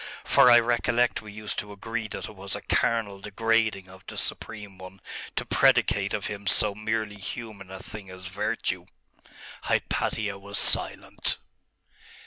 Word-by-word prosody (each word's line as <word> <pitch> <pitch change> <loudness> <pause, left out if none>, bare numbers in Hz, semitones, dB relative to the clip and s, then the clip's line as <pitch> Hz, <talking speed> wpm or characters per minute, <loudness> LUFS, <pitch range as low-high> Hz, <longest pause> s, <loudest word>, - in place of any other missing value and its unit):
For 140 -3 +6
I 120 -1 +9
recollect 120 +1 +2
we 105 - -10
used 105 0 -4
to 105 - -6
agree 110 +2 -4
that - - -5
it 110 - -11
was 95 0 -3
a - - -5
carnal 105 -4 +1
degrading 110 -2 +1
of 95 0 -14
the - - -7
Supreme 105 -3 -3
One 95 +1 -10 0.4
to - - -1
predicate - - +3
of - - -2
Him 100 -1 -5
so 105 +1 +4
merely 110 0 -2
human 105 -2 -6
a 95 - -7
thing 100 +1 -7
as 95 0 -10
virtue.' 95 -2 -2 0.8
Hypatia 105 -2 0
was 100 +1 -2
silent. - - +2
105 Hz, 150 wpm, -27 LUFS, 95-110 Hz, 0.8 s, I